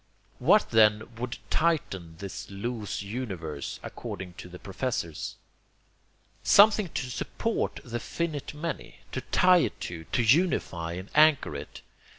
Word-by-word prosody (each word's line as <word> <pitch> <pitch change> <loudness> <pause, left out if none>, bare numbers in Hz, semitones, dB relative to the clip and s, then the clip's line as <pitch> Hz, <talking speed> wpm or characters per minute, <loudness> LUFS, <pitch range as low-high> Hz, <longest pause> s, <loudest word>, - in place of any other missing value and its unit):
What - - +4
then 110 -1 +5
would 120 0 -4
tighten 95 - 0
this 100 +1 -7
loose 105 +1 -4
universe, 95 - -5
according 90 -1 -6
to 90 - -8
the 90 - -9
professors? 95 - -3 1.1
Something 205 -2 +6
to 125 -3 -2
support 225 - -2
the 120 -1 -4
finite 150 +2 -3
many, 150 -9 -5
to 130 - -3
tie 180 +7 +5
it - - -1
to, 80 -2 -5
to 120 - 0
unify 110 - +2
and 95 +3 -7
anchor 155 - +5
it. 70 - -8
115 Hz, 130 wpm, -28 LUFS, 90-150 Hz, 1.1 s, Something